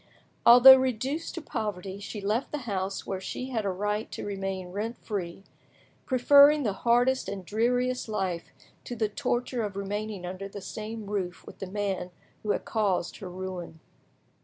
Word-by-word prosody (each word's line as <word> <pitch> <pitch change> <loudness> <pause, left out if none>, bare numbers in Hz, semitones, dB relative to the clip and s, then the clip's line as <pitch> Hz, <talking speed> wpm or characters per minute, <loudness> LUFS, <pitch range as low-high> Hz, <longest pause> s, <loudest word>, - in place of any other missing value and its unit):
Although 250 +3 +11
reduced 260 +4 -2
to - - -6
poverty, 200 -4 -4
she 205 +1 -6
left 215 +6 -1
the 300 - -2
house 195 -2 -3
where 190 -1 -4
she 255 +6 -5
had 225 -4 -1
a - - +1
right 210 +3 -2
to - - -5
remain 195 -2 -4
rent 220 +5 -3
free, 190 -3 -5 0.6
preferring 285 +3 +6
the 210 -5 0
hardest 245 +5 +2
and 195 -2 -6
dreariest 245 +4 0
life 185 -5 -2 0.3
to 245 - -5
the 220 -2 0
torture 245 +1 -1
of 205 -3 -3
remaining 200 -1 -4
under 185 +2 -5
the 200 +1 -8
same 215 +2 -6
roof 195 -3 -4
with - - -12
the 195 - -5
man 195 -2 -2 0.3
who 210 - -6
had - - 0
caused 200 -6 0
her 190 - -7
ruin. 180 -2 -6
210 Hz, 165 wpm, -28 LUFS, 190-240 Hz, 0.6 s, Although